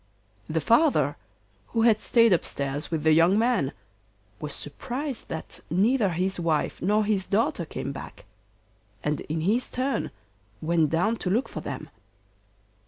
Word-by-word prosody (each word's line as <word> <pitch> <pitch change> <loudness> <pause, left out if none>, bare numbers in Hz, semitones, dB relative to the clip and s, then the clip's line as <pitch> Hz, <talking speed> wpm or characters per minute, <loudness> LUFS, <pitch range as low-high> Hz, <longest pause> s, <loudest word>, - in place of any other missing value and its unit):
The 160 0 0
father 225 - +3 0.5
who 225 - 0
had 220 -2 +4
stayed 230 -4 +5
upstairs 140 -3 -1
with 160 -3 -2
the 155 - +5
young 165 +5 +5
man 225 - +2 0.7
was 150 -1 -5
surprised 255 - -5
that 160 - -6
neither 205 +5 +3
his 185 +2 -1
wife 165 -3 0
nor 210 +4 +2
his 200 -3 0
daughter 200 -4 +1
came 140 - -5
back, 135 - -9 0.8
and 150 0 0
in 160 +1 -3
his 220 +9 +1
turn 260 +2 -1 0.5
went 160 0 +2
down 195 +9 +1
to 185 - -2
look 230 +8 +1
for - - -6
them. - - -6
185 Hz, 145 wpm, -26 LUFS, 155-230 Hz, 0.8 s, stayed